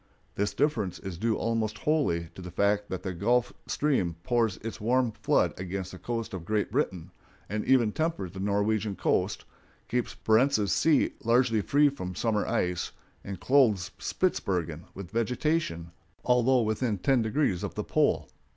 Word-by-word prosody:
This 105 Hz, +1 st, -1 dB
difference 110 Hz, -, 0 dB
is 90 Hz, -3 st, -7 dB
due 110 Hz, +1 st, +1 dB
almost 110 Hz, -2 st, -1 dB
wholly 105 Hz, -, 0 dB
to -, -, -10 dB
the 90 Hz, -, -7 dB
fact 100 Hz, +3 st, +1 dB
that 95 Hz, -, -4 dB
the 95 Hz, -, -3 dB
Gulf 120 Hz, +7 st, +1 dB
Stream 125 Hz, -, 0 dB
pours 115 Hz, -5 st, +1 dB
its 115 Hz, -1 st, -6 dB
warm 125 Hz, +2 st, +2 dB
flood -, -, +1 dB
against 95 Hz, 0 st, -4 dB
the 95 Hz, -, -10 dB
coast 115 Hz, -3 st, -4 dB
of 95 Hz, -3 st, -5 dB
Great 105 Hz, +2 st, -1 dB
Britain, 95 Hz, -, -1 dB, 0.4 s
and 105 Hz, +1 st, -2 dB
even 120 Hz, -5 st, +4 dB
tempers 160 Hz, -, -2 dB
the 95 Hz, -, -8 dB
Norwegian 105 Hz, +1 st, 0 dB
coast, -, -, 0 dB, 0.4 s
keeps 125 Hz, -1 st, -2 dB
Barentz's 110 Hz, -2 st, +3 dB
Sea 155 Hz, -4 st, +3 dB
largely 115 Hz, -1 st, +3 dB
free 145 Hz, +7 st, +4 dB
from 90 Hz, -10 st, -6 dB
summer 110 Hz, -1 st, 0 dB
ice, 90 Hz, -1 st, -1 dB, 0.3 s
and 95 Hz, -3 st, -6 dB
clothes 115 Hz, -, +3 dB
Spitzbergen 85 Hz, -4 st, -1 dB
with 95 Hz, -2 st, -8 dB
vegetation, 115 Hz, -, -1 dB, 0.3 s
although 125 Hz, 0 st, +4 dB
within 110 Hz, 0 st, 0 dB
ten 130 Hz, +5 st, +2 dB
degrees 110 Hz, -, 0 dB
of -, -, -5 dB
the -, -, -2 dB
pole. -, -, +1 dB
110 Hz, 160 wpm, -28 LUFS, 95-125 Hz, 0.4 s, even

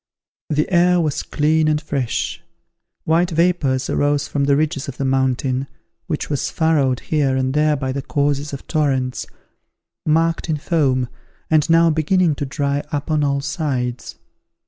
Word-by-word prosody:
The 150 Hz, 0 st, +1 dB
air 175 Hz, +1 st, +4 dB
was 155 Hz, -3 st, 0 dB
clear 155 Hz, +1 st, +1 dB
and 150 Hz, 0 st, +1 dB
fresh: 140 Hz, -6 st, -3 dB, 0.6 s
white 170 Hz, +2 st, +2 dB
vapours 160 Hz, -6 st, +1 dB
arose 145 Hz, 0 st, +1 dB
from 140 Hz, -1 st, -1 dB
the 140 Hz, 0 st, +3 dB
ridges 150 Hz, -2 st, -1 dB
of 140 Hz, -, -7 dB
the 135 Hz, -, -2 dB
mountain, 130 Hz, 0 st, 0 dB, 0.4 s
which 155 Hz, -5 st, -2 dB
was 145 Hz, -3 st, -1 dB
furrowed 145 Hz, -6 st, +1 dB
here 140 Hz, -4 st, 0 dB
and 130 Hz, 0 st, 0 dB
there 150 Hz, 0 st, +3 dB
by 135 Hz, -2 st, -2 dB
the 140 Hz, +1 st, -3 dB
courses 145 Hz, +1 st, -1 dB
of 140 Hz, -, -7 dB
torrents, 135 Hz, -5 st, -1 dB, 0.8 s
marked 165 Hz, +2 st, +1 dB
in 155 Hz, -, +1 dB
foam, 140 Hz, -6 st, +1 dB, 0.4 s
and 155 Hz, 0 st, +3 dB
now 165 Hz, 0 st, +5 dB
beginning 160 Hz, +2 st, +2 dB
to 145 Hz, 0 st, -4 dB
dry 140 Hz, 0 st, -1 dB
up 145 Hz, +1 st, -3 dB
on 150 Hz, -1 st, +2 dB
all 140 Hz, -1 st, +1 dB
sides. 135 Hz, -4 st, -3 dB
145 Hz, 155 wpm, -20 LUFS, 135-155 Hz, 0.8 s, now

